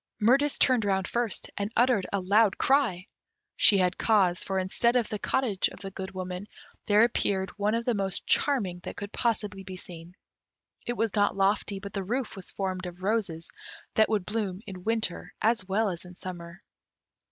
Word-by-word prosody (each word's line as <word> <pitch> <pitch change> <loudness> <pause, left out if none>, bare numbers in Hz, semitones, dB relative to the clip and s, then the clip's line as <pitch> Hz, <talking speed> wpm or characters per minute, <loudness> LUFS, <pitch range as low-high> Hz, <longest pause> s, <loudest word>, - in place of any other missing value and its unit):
Mirtis 270 +7 +3
turned 250 -4 +4
round 190 -2 0
first, 235 -3 -2
and 200 +1 -2
uttered 240 -5 +3
a 200 - +1
loud 200 +2 +3
cry; 230 -10 +2 0.5
she 200 - +6
had 180 -1 +1
cause; 190 -5 +3
for 195 - -2
instead 195 +6 +1
of 240 -3 +2
the 210 - -3
cottage 225 -7 +1
of - - -11
the 195 -1 -6
Good 190 0 -6
Woman, 185 0 -6 0.4
there 210 +1 +6
appeared 195 -5 +1
one 205 +2 0
of 230 0 -2
the 245 - +2
most 195 -3 -2
charming 205 -12 +1
that - - -7
could 200 0 -6
possibly 210 -4 -1
be 190 -1 -8
seen. 175 -1 -9 0.7
It 240 - 0
was 225 -2 0
not 205 -1 +2
lofty, 200 +1 +1
but 200 +1 -8
the 200 -2 -2
roof 240 +5 -2
was 190 -2 -7
formed 185 -2 -3
of 180 +1 -10
roses 190 -6 -1 0.4
that 220 - +4
would 210 -4 0
bloom 205 -3 -2
in 185 -4 -8
winter 215 -5 -1
as 220 -4 +1
well 210 +3 +1
as 175 -3 -3
in 180 0 -12
summer. 175 -1 -8
200 Hz, 185 wpm, -28 LUFS, 185-225 Hz, 0.7 s, she